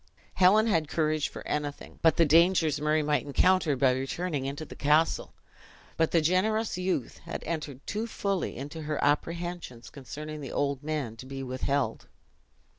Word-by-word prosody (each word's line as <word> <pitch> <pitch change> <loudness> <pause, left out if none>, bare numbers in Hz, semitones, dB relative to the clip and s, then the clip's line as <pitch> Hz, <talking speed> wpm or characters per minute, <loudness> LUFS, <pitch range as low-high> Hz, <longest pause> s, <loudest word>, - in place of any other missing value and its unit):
Helen 200 +4 +5
had 165 -9 +1
courage 155 -1 0
for - - -9
anything 145 -1 -4
but 165 -2 +4
the 165 - +5
dangers 160 -1 +4
Murray 155 +1 +2
might 150 0 +1
encounter 165 +1 +3
by 130 0 +4
returning 135 +3 -2
into 140 +3 -5
the - - -11
castle; 150 +3 +2 0.6
but 160 -1 +2
the 165 - +3
generous 205 +7 +1
youth 180 -8 -2
had - - -7
entered 150 -5 -5
too 215 +3 -3
fully 200 - -2
into 145 +5 -6
her 150 -1 -3
apprehensions 165 -3 -2
concerning 150 +2 -7
the 135 - -6
old 140 -2 -1
man 145 -7 -3
to 130 - -10
be 135 0 -5
withheld. 130 +2 -2
155 Hz, 160 wpm, -28 LUFS, 140-175 Hz, 0.6 s, Helen